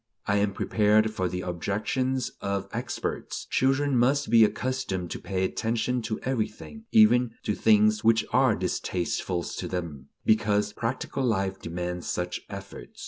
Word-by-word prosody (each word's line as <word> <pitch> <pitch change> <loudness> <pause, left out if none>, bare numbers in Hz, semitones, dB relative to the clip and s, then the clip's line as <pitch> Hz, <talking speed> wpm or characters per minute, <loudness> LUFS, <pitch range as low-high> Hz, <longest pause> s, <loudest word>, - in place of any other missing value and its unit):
I 100 0 +2
am 100 0 +1
prepared 110 +1 +2
for 95 -4 -1
the 90 +1 -3
objections 110 +9 -1
of 100 0 -2
"experts." 120 +2 -4
Children 135 +1 +2
must 130 +1 +2
be 115 -1 +7
accustomed 110 -6 -1
to - - -4
pay 95 -1 -2
attention 115 +5 -1
to 110 -1 -3
everything, 130 - -4
even 125 - +5
to 105 - 0
things 105 0 +3
which 115 0 +4
are - - +4
distasteful 90 0 -2
to - - -5
them, 80 -7 -5 0.2
because 105 -1 +2
practical 130 +3 -3
life 95 -5 0
demands 90 +1 -4
such 90 0 -2
efforts. - - -9
110 Hz, 140 wpm, -27 LUFS, 95-125 Hz, 0.2 s, be